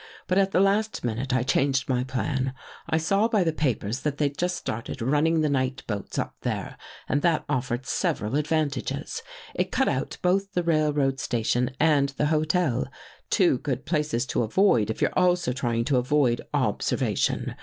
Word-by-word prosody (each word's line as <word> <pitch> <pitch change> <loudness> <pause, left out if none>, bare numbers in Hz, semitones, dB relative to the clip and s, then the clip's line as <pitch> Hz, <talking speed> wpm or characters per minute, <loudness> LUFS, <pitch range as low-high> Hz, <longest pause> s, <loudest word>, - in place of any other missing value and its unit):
But, 185 +2 +2
at 195 0 +3
the 190 - +2
last 205 +3 +1
minute, 120 +3 -2
I 125 -1 +2
changed 135 0 +1
my 125 -1 +1
plan. 130 0 -2 0.3
I 160 - +2
saw 195 +7 +2
by 215 -4 +2
the 165 -2 0
papers 125 -6 -1
that 145 0 -2
they'd 145 -2 0
just 180 +3 -1
started 115 -8 -5
running 150 +6 +2
the 155 - +2
night 130 -1 -1
boats 105 -3 -5
up - - -2
there - - -3 0.3
and 145 - +1
that 165 -1 +2
offered 125 -2 -2
several 145 - -1
advantages. 145 -2 -1 0.3
It - - -1
cut - - +2
out - - -2
both 195 +2 +1
the 180 - 0
railway 150 -4 +2
statidn 120 +1 0
and 145 -3 +3
the - - +1
hotel 155 -5 +1 0.2
— - - -22
two 175 - +3
good 135 -1 -3
places 150 -7 0
to - - +2
avoid 115 - +3
If 110 - -4
you're - - +1
also 180 -7 +2
trying 120 -2 -1
to 135 -1 +2
avoid 125 -1 +2
observation. - - 0
145 Hz, 175 wpm, -26 LUFS, 125-165 Hz, 0.3 s, at